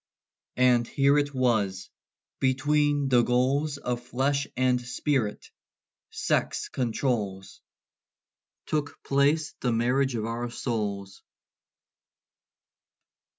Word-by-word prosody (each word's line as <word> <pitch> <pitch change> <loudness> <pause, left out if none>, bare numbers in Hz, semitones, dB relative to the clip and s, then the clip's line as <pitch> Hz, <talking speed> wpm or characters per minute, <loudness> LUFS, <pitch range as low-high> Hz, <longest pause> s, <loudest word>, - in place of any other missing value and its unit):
And 125 -2 +4
here 140 +1 +3
it 145 0 -1
was 110 -8 0 0.5
between 145 +2 +2
the 125 -2 +5
goals 135 +5 +1
Of 125 -3 -3
flesh 135 +3 -1
and 125 -1 +2
spirit, 125 -3 -2 0.6
sex - - -1
controls 110 -6 -2 1.0
Took 145 -2 -3
place 145 +3 +2
the 125 - 0
marriage 125 +3 +1
of 110 -1 -2
our 120 +1 -3
souls. 100 -5 -4
125 Hz, 90 wpm, -27 LUFS, 115-140 Hz, 1.0 s, the